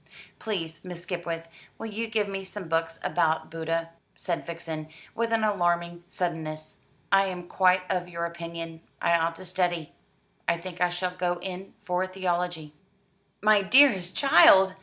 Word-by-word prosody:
"Please, 165 -7 -4
Miss 180 -2 -8
Skipwith, 170 -2 -4 0.3
will - - -6
you 225 +1 -3
give 220 -2 0
me 195 -1 -4
some 190 -1 -7
books 165 0 0
about 160 -1 +1
Buddha?" 165 0 -2 0.2
said 170 -1 -3
Vixen, 165 -2 -5 0.2
with 230 0 -1
an 225 -1 +2
alarming 175 -4 +1
suddenness. 155 -4 -4 0.3
"I 195 0 +6
am 180 -2 -5
quite 185 0 +3
of 180 -1 -1
your 170 -1 -3
opinion: 170 -1 -6 0.2
I - - +2
ought 165 0 +2
to 185 - -10
study. 175 -3 -1 0.6
I 170 - +2
think 180 0 -8
I 180 - +4
shall 180 +1 -2
go 180 -1 -1
in 190 +1 -7
for 180 +1 0
theology." 175 -4 -2 0.7
"My 210 -1 +6
dearest 195 -5 +5
child!" 190 -6 +7
175 Hz, 155 wpm, -27 LUFS, 165-190 Hz, 0.7 s, child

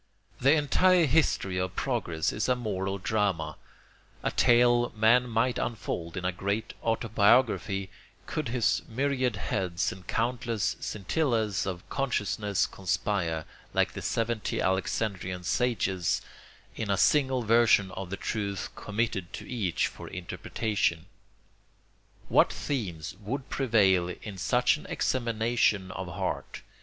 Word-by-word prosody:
The 135 +3 +5
entire 165 +4 +4
history 125 - +2
of 90 0 -2
progress 90 -11 -1
is 105 +4 -1
a 125 - +4
moral 100 -5 -2
drama, 95 -7 -1 0.7
a - - 0
tale 120 0 +4
man 120 +3 +4
might 120 +2 +1
unfold 90 -6 -3
in 90 - -3
a 90 - +2
great 100 +4 -2
autobiography, 110 -3 +2 0.3
could 155 -3 -3
his 120 -1 +1
myriad 130 -1 0
heads 90 -1 -1
and 95 -1 -11
countless 115 -3 -1
scintillas 110 -2 -1
of 90 -2 -5
consciousness 105 -7 0
conspire, 90 -4 -1 0.3
like - - +3
the - - -6
seventy 115 -1 -1
Alexandrian 95 -1 -1
sages, 95 -5 0 0.5
in 110 - -4
a 100 - +2
single 130 +2 +3
version 110 -4 +4
of 95 -1 -6
the 100 - -4
truth 100 -3 -3
committed 105 -4 -2
to - - -7
each 105 -9 0
for - - -7
interpretation. 90 -1 -2 1.2
What - - +4
themes 90 - -4
would 130 +6 -4
prevail 100 -9 +3
in 100 -3 -7
such 125 +10 +3
an - - -12
examination 115 -5 +1
of 95 -1 -5
heart? 85 - -4
105 Hz, 125 wpm, -28 LUFS, 95-120 Hz, 1.2 s, The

